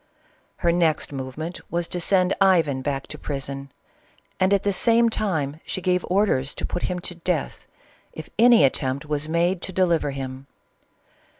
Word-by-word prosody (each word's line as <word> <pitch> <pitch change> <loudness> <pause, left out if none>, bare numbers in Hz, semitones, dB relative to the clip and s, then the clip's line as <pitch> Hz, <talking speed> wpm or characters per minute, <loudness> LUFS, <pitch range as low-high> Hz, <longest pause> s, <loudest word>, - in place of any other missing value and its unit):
Her 170 - +1
next 165 -4 +1
movement 140 +6 -5
was 170 0 -1
to 180 - -3
send 185 +1 +2
Ivan 165 -9 +3
back 135 0 -2
to 150 - -9
prison, 140 -1 -5 0.7
and 185 +1 +3
at 200 -1 +3
the 200 - +1
same 230 +3 +3
time 160 -10 -2
she 190 - -4
gave 180 0 +1
orders 180 -8 +1
to - - -4
put 175 - -3
him 180 - -2
to 175 - -4
death, 170 -2 -3 0.4
if 160 - -9
any 235 -6 +7
attempt 135 +1 0
was 150 0 -2
made 170 +2 +1
to - - -4
deliver 170 -5 +1
him. 135 0 -6
170 Hz, 165 wpm, -24 LUFS, 140-185 Hz, 0.7 s, any